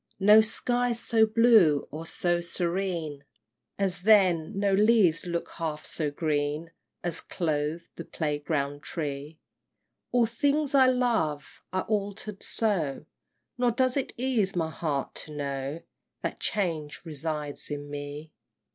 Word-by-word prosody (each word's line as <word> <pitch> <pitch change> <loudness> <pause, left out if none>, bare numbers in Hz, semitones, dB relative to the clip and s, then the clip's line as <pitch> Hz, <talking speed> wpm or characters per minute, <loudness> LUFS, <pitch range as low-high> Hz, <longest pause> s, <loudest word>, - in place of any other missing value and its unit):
IX. - - -47
No 210 +2 +8
skies 240 +2 0
so 225 -2 +3
blue 215 - +5
or 160 +2 -6
so 175 0 0
serene 170 -4 -2 0.5
As 190 -3 0
then; 190 -3 +4
no 200 -1 +2
leaves 200 -5 +4
look 170 -1 -2
half 155 -2 -4
so 155 -3 -2
green 150 +1 -1 0.3
As 170 -2 0
clothed 155 0 -2
the 170 - -5
playground 145 -2 -2
tree! 145 0 -5 0.7
All 245 -1 +4
things 285 +5 0
I 265 -2 +6
loved 225 - +1 0.3
are 185 0 -1
altered 205 -1 -3
so, 170 -11 0 0.5
Nor 245 -1 +3
does 255 +2 +1
it 275 - -1
ease 235 -7 0
my 160 -2 -1
heart 150 -4 -2
to 155 - -9
know 140 +2 -3 0.4
That - - -3
change 165 -7 -2
resides 150 -1 -4
in 145 -1 -5
me! 145 +2 -7
170 Hz, 130 wpm, -28 LUFS, 150-215 Hz, 0.7 s, No